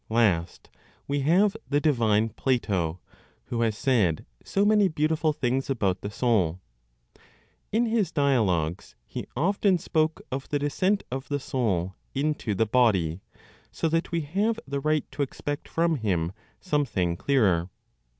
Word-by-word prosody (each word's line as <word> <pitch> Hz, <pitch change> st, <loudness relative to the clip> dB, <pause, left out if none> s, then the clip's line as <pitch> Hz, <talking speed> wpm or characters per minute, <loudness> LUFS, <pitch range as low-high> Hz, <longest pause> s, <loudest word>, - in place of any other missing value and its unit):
Last, 105 Hz, -7 st, +1 dB, 0.4 s
we 145 Hz, +1 st, 0 dB
have 185 Hz, +9 st, +3 dB
the 145 Hz, -, +3 dB
divine 115 Hz, -7 st, +2 dB
Plato, 100 Hz, -9 st, -1 dB, 0.5 s
who 120 Hz, -1 st, -2 dB
has 110 Hz, -3 st, +1 dB
said 110 Hz, -, +1 dB, 0.2 s
so 200 Hz, +1 st, +1 dB
many 210 Hz, -1 st, +5 dB
beautiful 155 Hz, -1 st, +1 dB
things 135 Hz, -2 st, -1 dB
about 100 Hz, -8 st, 0 dB
the 100 Hz, -, -4 dB
soul. 105 Hz, -7 st, +1 dB, 1.1 s
In 230 Hz, +3 st, +2 dB
his 220 Hz, -6 st, +1 dB
dialogues 105 Hz, -, +1 dB
he -, -, -6 dB
often 190 Hz, -, +2 dB
spoke 155 Hz, -1 st, 0 dB
of 135 Hz, +1 st, -4 dB
the 145 Hz, -, +1 dB
descent 185 Hz, +8 st, 0 dB
of 130 Hz, +1 st, -4 dB
the 145 Hz, -1 st, 0 dB
soul 100 Hz, -10 st, -1 dB, 0.2 s
into 140 Hz, -6 st, -1 dB
the 110 Hz, -, +2 dB
body, 100 Hz, -8 st, +2 dB, 0.5 s
so -, -, -1 dB
that 165 Hz, +1 st, 0 dB
we 170 Hz, -1 st, 0 dB
have 205 Hz, +9 st, 0 dB
the 140 Hz, -, -2 dB
right 155 Hz, +1 st, +1 dB
to -, -, -4 dB
expect 145 Hz, +1 st, -3 dB
from 165 Hz, -1 st, +1 dB
him 90 Hz, -8 st, 0 dB, 0.3 s
something 120 Hz, -, 0 dB
clearer. 95 Hz, -8 st, +2 dB
135 Hz, 140 wpm, -26 LUFS, 105-155 Hz, 1.1 s, many